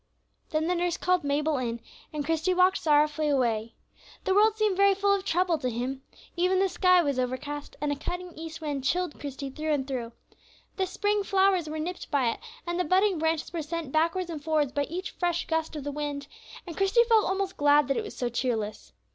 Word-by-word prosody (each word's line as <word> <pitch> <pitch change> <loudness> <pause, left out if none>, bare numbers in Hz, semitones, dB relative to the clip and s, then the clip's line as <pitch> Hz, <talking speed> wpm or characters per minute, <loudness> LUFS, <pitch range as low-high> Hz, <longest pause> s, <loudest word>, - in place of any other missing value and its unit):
Then 310 0 0
the 355 - +1
nurse 350 -1 0
called 365 -2 +1
Mabel 290 0 0
in, 235 -2 -3 0.3
and 295 -2 -3
Christie 325 +4 +1
walked 365 +1 +4
sorrowfully 300 0 +2
away. 235 -5 0 0.5
The 380 - +1
world 430 +2 +4
seemed 425 -3 +2
very 395 0 +5
full 400 +1 +2
of 395 -1 0
trouble 350 -2 +1
to 255 - -1
him. 250 +3 -3 0.3
Even 365 +2 +2
the 385 +1 +3
sky 365 -1 +4
was 280 -4 0
overcast, 265 +4 -4
and 295 0 -1
a - - 0
cutting 355 +5 -5
east 325 +1 -8
wind 290 -3 -3
chilled 350 +3 -1
Christie 275 -1 -6
through 310 +3 -3
and 270 -2 -1
through. 245 -4 -4 0.6
The 380 -1 0
spring 410 +2 0
flowers 380 -4 +2
were 310 - -4
nipped 345 +4 -5
by 260 -5 +2
it, - - -7 0.3
and 345 +1 -2
the - - +3
budding 375 +2 +2
branches 320 +1 -1
were 335 - -2
sent 315 -2 -4
backwards 335 +3 +1
and 305 -3 -6
forwards 305 -3 +1
by 285 0 0
each 365 +7 -5
fresh 345 -1 -1
gust 320 0 -1
of 295 - -5
the 290 - -3
wind, 290 -1 -4 0.4
and 340 -3 -7
Christie 395 +5 +4
felt 450 -2 +4
almost 385 0 -1
glad 290 0 +4
that 275 - 0
it - - -1
was 425 - -9
so 245 - -1
cheerless. 235 -3 -3
320 Hz, 215 wpm, -28 LUFS, 285-365 Hz, 0.6 s, very